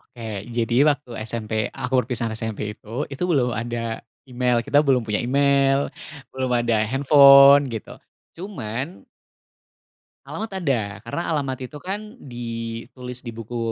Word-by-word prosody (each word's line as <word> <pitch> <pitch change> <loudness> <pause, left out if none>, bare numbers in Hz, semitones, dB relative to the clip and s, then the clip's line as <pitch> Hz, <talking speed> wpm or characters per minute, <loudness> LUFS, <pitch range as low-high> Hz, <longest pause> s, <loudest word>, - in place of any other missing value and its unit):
Oke, 120 - -18 0.4
jadi 115 0 0
waktu 145 -3 -1 0.2
SMP 110 -1 -4 0.2
aku - - -5
perpisahan 115 -2 -1
SMP 110 -2 -4 0.2
itu, 115 +7 -5
itu 140 - -6
belum 130 -7 +2
ada 115 0 -3 0.3
email, 125 -1 +1
kita 145 - +4
belum 135 -3 +3
punya 105 -1 0
email, 140 +1 +2 0.4
belum 130 -1 -2
ada 115 -2 +1
handphone, 140 +1 +7
gitu, 110 - -7 0.4
cuman 150 - -6 1.2
Alamat 220 0 -6
ada, 115 - -1
karena 115 +8 -3
alamat 140 -5 -1
itu, 150 - -12
kan, 210 +5 -6
ditulis 120 - -7
di - - -3
buku 115 +1 -6
125 Hz, 130 wpm, -23 LUFS, 115-140 Hz, 1.2 s, handphone